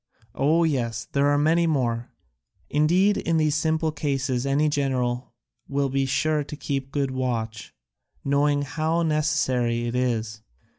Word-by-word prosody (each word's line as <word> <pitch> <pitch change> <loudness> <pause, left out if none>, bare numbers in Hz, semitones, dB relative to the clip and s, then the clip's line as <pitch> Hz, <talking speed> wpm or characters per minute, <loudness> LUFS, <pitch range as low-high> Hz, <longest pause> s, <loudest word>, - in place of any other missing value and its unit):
"Oh, 155 +6 +2
yes, 120 -8 -1
there 140 0 +2
are 145 0 +3
many 165 +3 +3
more; 120 -6 -1 0.6
indeed 180 +7 +3
in 165 -1 0
these 155 -2 +2
simple 160 +1 0
cases 135 -3 -1
any 145 +3 +2
general 130 -4 -1 0.3
will 140 0 0
be 135 0 0
sure 150 +3 +1
to 150 - -8
keep 135 -2 -4
good 140 -2 -1
watch, 115 -4 -3 0.5
knowing 145 +1 +2
how 160 +3 -1
necessary 130 -7 +1
it 120 - -3
is. 115 -4 -1
140 Hz, 140 wpm, -24 LUFS, 125-155 Hz, 0.6 s, are